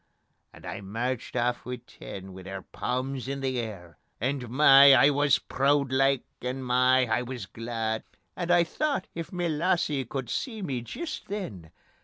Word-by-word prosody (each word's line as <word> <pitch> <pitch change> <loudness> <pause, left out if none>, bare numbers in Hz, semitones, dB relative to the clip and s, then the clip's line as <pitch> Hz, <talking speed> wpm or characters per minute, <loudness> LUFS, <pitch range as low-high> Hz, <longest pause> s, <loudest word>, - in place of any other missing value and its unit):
And - - -14
I - - -5
merched 115 +6 -3
aff 120 0 0
wi' 125 - -4
ten, 95 -4 -9
wi' 95 - -9
their 95 +1 -7
palms 130 +1 -3
in 140 0 -3
the 130 -2 -1
air, 95 -8 -7 0.2
And 125 0 -2
my! 140 +1 +8
I 140 +3 +6
wis 145 0 +3
prood 140 0 +1
like, 135 0 +3 0.2
and 130 +1 -4
my! 125 +1 +4
I 115 +1 +1
wis 125 0 -6
glad. 115 -1 -3 0.3
And 175 -1 -4
I 175 -1 +5
thocht: 280 - -1
if 165 -1 -6
ma 180 -2 -2
lassie 155 -4 +1
could 130 +1 -4
see 225 -6 -3
me 130 -8 -2
jist 310 - -6
then. 115 - -6
130 Hz, 170 wpm, -27 LUFS, 120-145 Hz, 0.3 s, my